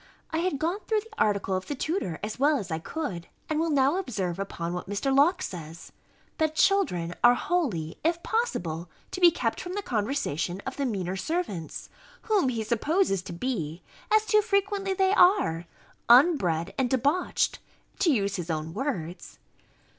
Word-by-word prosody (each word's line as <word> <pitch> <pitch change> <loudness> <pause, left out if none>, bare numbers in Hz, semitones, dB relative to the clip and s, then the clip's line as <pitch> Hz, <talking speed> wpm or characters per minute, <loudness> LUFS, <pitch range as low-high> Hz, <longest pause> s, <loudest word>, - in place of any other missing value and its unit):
I 320 - 0
had 345 -4 0
gone 335 +7 -1
through 435 -1 +2
the 435 0 -15
article 200 -2 0
of 185 - -4
the 290 - -3
tutor, 275 - -2
as 215 +3 -4
well 290 +2 +4
as 200 -7 -6
I 160 - -1
could; 185 - -5 0.2
and 310 0 -1
will 330 +1 +1
now 280 +2 +3
observe 195 - -3
upon 175 -3 -4
what 180 +1 -5
Mr. 270 +7 0
Locke 345 +7 +4
says, 165 -2 -7 0.5
That 315 -1 +1
children 180 - +2
are 240 0 +7
wholly, 235 - -1
if 340 +2 0
possible, 175 - -2 0.2
to 370 - -5
be 350 - +9
kept 335 - -2
from 360 - -6
the 410 - -3
conversation 210 - -1
of 265 - -5
the 280 -2 0
meaner 190 -5 -2
servants; 200 - -3 0.4
whom 410 -11 +2
he 230 -3 -2
supposes 235 - +1
to 180 - -8
be, 170 - -3 0.3
as 435 0 +4
too 425 -1 +4
frequently 400 -2 0
they 380 0 +3
are, 355 - +4 0.4
unbred 235 - +4
and 255 -2 +2
debauched, 280 +8 +1 0.4
to 375 -5 +4
use 200 -6 0
his 175 -1 -5
own 160 0 -3
words. 185 - -4
260 Hz, 170 wpm, -27 LUFS, -, 0.5 s, be